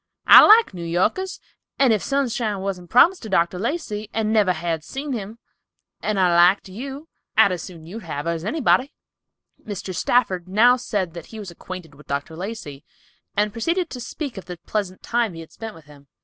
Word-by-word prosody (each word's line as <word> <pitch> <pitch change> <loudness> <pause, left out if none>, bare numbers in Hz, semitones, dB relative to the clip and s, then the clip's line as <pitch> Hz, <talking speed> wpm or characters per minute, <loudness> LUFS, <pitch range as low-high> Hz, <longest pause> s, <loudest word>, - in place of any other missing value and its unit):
I - - +10
like 440 - +7
New 175 -2 -7
Yorkers, 185 - -1 0.4
and 265 -4 +4
if 210 - 0
Sunshine 235 -7 -1
wasn't 185 -3 -4
promised 345 - +5
to 220 - -8
Dr. 180 -1 +1
Lacey 215 - -3
and 220 -1 0
never 210 -4 +4
had 165 -2 -2
seen 275 - -5
him, 215 -1 -6 0.6
and 210 -2 -1
I 180 -2 +3
liked 180 +4 +5
you, 270 +9 -7 0.3
I'd 220 -3 +6
as 180 -2 -3
soon 165 -3 -10
you'd 205 +8 -8
have 150 -4 -5
her 170 - 0
as 165 -1 -4
anybody." 265 - +1 0.7
Mr. 195 -2 -6
Stafford 185 -3 +1
now 225 +6 +5
said 205 -9 -3
that 170 -2 -9
he 225 - -11
was 200 -4 -7
acquainted 175 -2 -9
with 150 +1 -17
Dr. 140 +3 -3
Lacey, 175 -7 -7 0.5
and 210 0 +1
proceeded 335 +9 -1
to 250 - -6
speak 250 +1 -6
of - - -13
the 180 -1 -7
pleasant 195 -4 -3
time 230 -6 0
he 165 - -7
had 160 - -13
spent 225 -1 -8
with 160 - -15
him. 145 -1 -17
200 Hz, 195 wpm, -22 LUFS, 175-240 Hz, 0.7 s, I